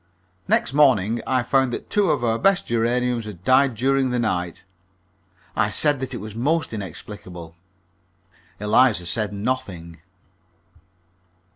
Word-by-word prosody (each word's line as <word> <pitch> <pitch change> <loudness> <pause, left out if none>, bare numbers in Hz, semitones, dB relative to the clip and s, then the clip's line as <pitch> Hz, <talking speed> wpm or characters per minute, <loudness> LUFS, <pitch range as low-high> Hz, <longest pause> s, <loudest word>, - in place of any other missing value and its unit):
Next 120 - +1
morning 120 -6 +3
I 130 -2 +1
found 135 0 +2
that - - -6
two 205 -3 +2
of 140 -5 0
our 115 -1 +1
best 195 -2 +2
geraniums 120 0 0
had 95 -5 -9
died 130 +2 +3
during 135 +3 +1
the 125 - -1
night. 90 -7 -2 0.9
I 105 -2 +2
said 145 +6 +2
that 130 -1 -4
it - - -3
was 110 -1 -8
most 150 +6 -1
inexplicable. 90 -3 -8 1.0
Eliza 105 -2 +3
said 105 +2 -2
nothing. 100 -7 -4
115 Hz, 130 wpm, -22 LUFS, 100-130 Hz, 1.0 s, morning